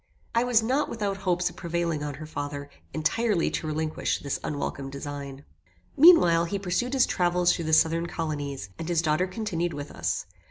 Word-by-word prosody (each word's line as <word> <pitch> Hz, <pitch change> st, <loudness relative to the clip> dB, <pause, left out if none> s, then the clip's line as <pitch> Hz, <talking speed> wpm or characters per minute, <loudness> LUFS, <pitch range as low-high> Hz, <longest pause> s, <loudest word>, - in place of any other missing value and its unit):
I 230 Hz, +1 st, +3 dB
was 240 Hz, -3 st, +3 dB
not 265 Hz, +6 st, +1 dB
without 205 Hz, -4 st, -2 dB
hopes 180 Hz, -2 st, 0 dB
of -, -, -18 dB
prevailing 170 Hz, -3 st, -2 dB
on 145 Hz, -1 st, -4 dB
her 155 Hz, +3 st, -8 dB
father 145 Hz, -1 st, -5 dB, 0.2 s
entirely 205 Hz, +4 st, +1 dB
to 155 Hz, -, -3 dB
relinquish 155 Hz, 0 st, -1 dB
this 140 Hz, -, -3 dB
unwelcome 140 Hz, -2 st, -3 dB
design. 140 Hz, 0 st, -7 dB, 0.5 s
Meanwhile, 270 Hz, -, +7 dB
he 200 Hz, +4 st, -2 dB
pursued 200 Hz, +7 st, -1 dB
his 265 Hz, -2 st, +4 dB
travels 175 Hz, 0 st, +2 dB
through 170 Hz, -, -4 dB
the 160 Hz, -, -1 dB
southern 165 Hz, +2 st, +4 dB
colonies, 145 Hz, -, -4 dB
and 165 Hz, -, -4 dB
his 170 Hz, -1 st, +1 dB
daughter 155 Hz, +3 st, +2 dB
continued 180 Hz, -4 st, -2 dB
with 145 Hz, 0 st, -6 dB
us. -, -, -2 dB
170 Hz, 175 wpm, -27 LUFS, 150-195 Hz, 0.5 s, Meanwhile